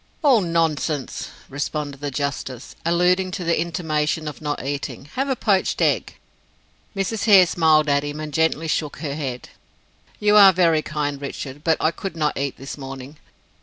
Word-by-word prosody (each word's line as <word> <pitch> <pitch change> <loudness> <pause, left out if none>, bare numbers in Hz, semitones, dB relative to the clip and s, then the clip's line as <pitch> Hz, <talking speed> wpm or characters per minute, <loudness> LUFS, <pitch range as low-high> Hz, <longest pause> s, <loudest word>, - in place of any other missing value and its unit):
"All 265 -7 +5
nonsense," 160 -5 -1 0.2
responded 145 0 -4
the 145 - -2
justice, 135 -2 -4
alluding 180 +2 +2
to 180 - -3
the 170 -1 +1
intimation 155 -2 -1
of 150 - -7
not 145 -3 -3
eating. 140 -1 -4
"Have 270 +2 -1
a 265 - +1
poached 200 -5 +1
egg." - - +1 0.8
Mrs. 200 +2 -2
Hare 195 -4 +8
smiled 160 -3 +3
at 140 0 +3
him, 145 +1 -5
and 155 -1 -6
gently 160 +1 +1
shook 150 -1 -2
her 145 -3 -4
head. 135 -4 -5 0.7
"You 210 0 +4
are 195 -2 +9
very 165 -3 +3
kind, 145 -2 -3
Richard, 140 0 -6
but 165 -1 +2
I 155 - +2
could 190 0 -6
not 150 -2 0
eat 140 0 -2
it - - -32
this 135 +2 -8
morning. 135 +2 -8
155 Hz, 170 wpm, -22 LUFS, 145-175 Hz, 0.8 s, are